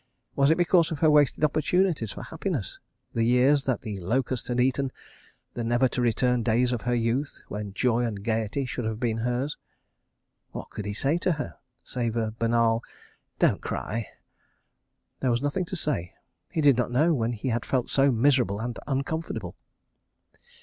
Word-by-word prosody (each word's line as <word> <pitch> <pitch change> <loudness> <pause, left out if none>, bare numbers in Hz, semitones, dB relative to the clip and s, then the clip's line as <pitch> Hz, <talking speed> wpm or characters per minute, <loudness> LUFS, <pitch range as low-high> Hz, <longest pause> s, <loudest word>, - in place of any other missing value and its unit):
Was 140 0 +4
it 160 - +5
because 175 -1 +4
of 160 - -3
her 155 +1 +4
wasted 150 -1 +3
opportunities 155 - +2
for - - -7
happiness, - - -4 0.3
the 115 - +1
years 130 +4 +4
that 130 -3 0
the 105 -4 -5
locust 125 +7 -1
had 125 0 -1
eaten, 130 +1 +1 0.6
the 120 - -3
never 120 +3 +3
to 125 - -2
return 120 +1 +2
days 120 +2 +2
of 120 -3 -1
her 120 0 0
youth, 120 +5 -1
when 105 -1 -5
joy 120 -1 +2
and 105 -4 -3
gaiety 115 +4 -1
should 125 -2 -4
have 110 0 -2
been 115 -2 0
hers? 125 +5 -1 1.0
What - - -7
could 105 - -6
he 105 - -3
say 140 +9 +1
to 180 0 +1
her?—save 125 -5 -5
a 110 -2 0
banal 115 0 +2 0.6
"Don't - - +2
cry"? 110 +1 -3 1.1
There 130 - +1
was 120 +2 +1
nothing 145 +6 0
to 190 - -5
say. 145 - -2 0.3
He 160 - -1
did 140 -4 +5
not 125 - +1
know 150 +8 +3
when 120 -4 0
he 115 +3 -3
had 115 0 0
felt 130 -3 -1
so 140 0 +4
miserable 120 -4 +2
and 120 +1 -4
uncomfortable. 145 +4 -3
125 Hz, 170 wpm, -26 LUFS, 115-140 Hz, 1.1 s, it